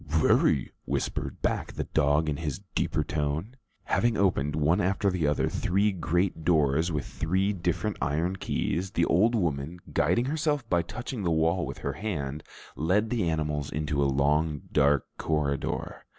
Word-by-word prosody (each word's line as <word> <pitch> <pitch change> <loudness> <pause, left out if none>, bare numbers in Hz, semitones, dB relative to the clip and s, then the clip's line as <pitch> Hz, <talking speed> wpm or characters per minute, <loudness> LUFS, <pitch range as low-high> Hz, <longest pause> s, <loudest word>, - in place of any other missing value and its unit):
"Very," 75 -3 +3
whispered - - -3
back - - -1
the - - -2
dog 75 +1 +2
in 75 -2 -1
his 75 +4 -4
deeper 75 - 0
tone. 80 - -2 0.3
Having 120 -2 +1
opened, 75 -7 +1
one 80 +6 +2
after 95 +1 +1
the 85 -5 0
other, 75 - +1
three 100 +3 +1
great 90 -1 -1
doors 80 0 +2
with 75 -4 -2
three 95 +5 0
different 95 +3 -1
iron 80 +8 0
keys, 90 0 -1
the 85 -3 +1
old 110 +8 +3
woman, 80 -4 -1 0.2
guiding 90 +11 +2
herself 145 -3 -1
by 85 -5 +2
touching 120 +6 -6
the 90 - 0
wall 80 +1 +1
with 70 - -6
her 70 - -3
hand, 75 -4 -4 0.3
led 100 +9 +1
the 110 -8 +1
animals 75 -3 -1
into 75 -1 -1
a - - +3
long 75 +2 +1
dark 70 -1 +3
corridor. 75 -3 -2
80 Hz, 160 wpm, -28 LUFS, 75-95 Hz, 0.3 s, Very